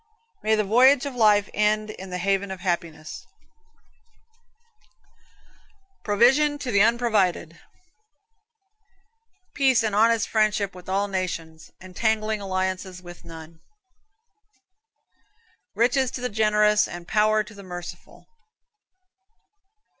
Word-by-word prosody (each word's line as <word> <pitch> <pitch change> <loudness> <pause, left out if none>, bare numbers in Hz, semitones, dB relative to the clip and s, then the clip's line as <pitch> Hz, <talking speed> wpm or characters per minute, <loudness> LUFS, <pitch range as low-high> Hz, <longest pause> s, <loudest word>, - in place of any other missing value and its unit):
May 220 +1 +2
the 215 - +1
voyage 250 +7 +4
of 280 - -5
life 210 -4 +3
end 215 +1 0
in 190 -2 -10
the 180 - -4
haven 195 +1 -1
of 190 -1 -7
happiness. 170 -4 -4 2.8
Provision 265 +8 +3
to 265 -4 -5
the 200 -2 +3
unprovided. 210 -8 +1 1.9
Peace 260 -4 +2
and 215 -2 -1
honest 225 +1 +3
friendship 215 -2 0
with 180 0 -12
all 200 +2 0
nations; 170 -4 -5
entangling 215 +3 -2
alliances 185 -1 -3
with 175 0 -12
none. 160 0 -12 2.2
Riches 255 +2 +2
to 245 - -7
the 250 - -2
generous, 210 -1 +2
and 175 0 -9
power 215 0 +2
to 210 - -14
the 200 - -12
merciful. 175 -2 -10
210 Hz, 105 wpm, -24 LUFS, 185-220 Hz, 2.8 s, voyage